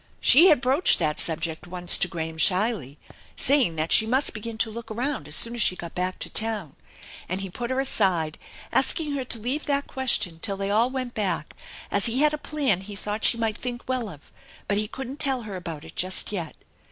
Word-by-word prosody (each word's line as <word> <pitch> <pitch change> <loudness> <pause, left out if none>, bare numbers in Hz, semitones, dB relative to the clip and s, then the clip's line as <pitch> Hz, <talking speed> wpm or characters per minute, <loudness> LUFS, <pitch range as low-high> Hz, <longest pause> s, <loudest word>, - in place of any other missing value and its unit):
She 320 +9 +7
had 305 -8 +4
broached 270 +7 +3
that 150 0 -1
subject 160 +1 -1
once 175 0 +4
to - - +1
Graham 160 -2 -6
shyly, 180 - +2 0.4
saying 260 - +2
that 155 +1 -2
she 220 - +4
must 260 +4 +2
begin 220 +1 -7
to 220 0 0
look 230 +1 -9
around 240 - -3
as 150 - 0
soon 235 - +4
as 240 - -3
she 185 - +4
got 170 -2 -9
back 185 +1 -3
to - - -4
town, 215 -9 +1 0.5
and 185 +2 -3
he 195 -2 -6
put 240 +5 -5
her 260 0 -1
aside, 185 - 0 0.3
asking 310 -3 +1
her 280 -2 -2
to 235 - +1
leave 255 +8 -3
that 285 -1 0
question 210 - 0
till 200 -3 -3
they 195 0 -3
all 225 +4 +2
went 255 -2 -5
back, 205 -3 -3 0.4
as 200 +2 +4
he 245 +4 0
had 300 0 +5
a 300 - -3
plan 280 - 0
he 205 +1 -9
thought 210 +2 -5
she 235 - +4
might 225 -2 -2
think 245 -1 -5
well 255 -4 -2
of, 150 -5 -14 0.4
but 205 0 0
he 210 - -2
couldn't 265 +5 -8
tell 265 -4 +3
her 205 -3 -7
about 165 -4 -7
it 160 - -13
just 185 +2 0
yet. 175 -6 -5
215 Hz, 220 wpm, -24 LUFS, 180-255 Hz, 0.5 s, She